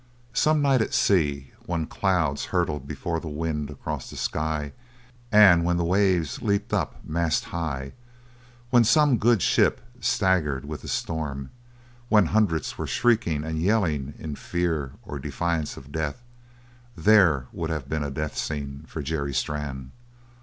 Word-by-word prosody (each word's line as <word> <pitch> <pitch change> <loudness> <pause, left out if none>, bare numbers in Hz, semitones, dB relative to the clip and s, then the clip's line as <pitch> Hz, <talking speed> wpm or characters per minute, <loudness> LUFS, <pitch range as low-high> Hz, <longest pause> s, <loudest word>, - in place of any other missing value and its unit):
Some 150 +5 +3
night 135 -4 +4
at - - -1
sea, 70 -8 +2 0.2
when 85 -2 -1
clouds 85 -6 0
hurtled 80 -7 -1
before 85 +3 -3
the 80 - -8
wind 75 -1 -3
across 70 - -5
the - - -9
sky 75 -1 -2 0.6
and 100 -5 +7
when 85 0 +1
the 85 - 0
waves 90 -4 +1
leaped 100 +2 0
up - - 0
mast 80 0 0
high; 70 -6 -3 0.8
when 120 -1 +6
some 140 0 +4
good 115 -3 +3
ship - - +3 0.2
staggered 95 - +1
with 75 +1 -6
the - - -10
storm, 70 -5 -3 0.6
when 105 -4 +5
hundreds 100 -8 +1
were - - -2
shrieking 110 -11 +1
and 80 0 -3
yelling 80 -9 +1
in 80 -2 -6
fear 80 -4 -2
or 70 - -6
defiance 75 +3 -2
of 65 +1 -12
death; 80 - -3 0.7
there 95 -11 +5
would 80 -2 -3
have 75 -5 -3
been 80 +1 -2
a 70 - -3
death 75 +3 -4
scene 70 -1 -4
for 80 - -5
Jerry 70 -2 -2
Strann. 65 -1 -3
80 Hz, 150 wpm, -25 LUFS, 75-95 Hz, 0.8 s, and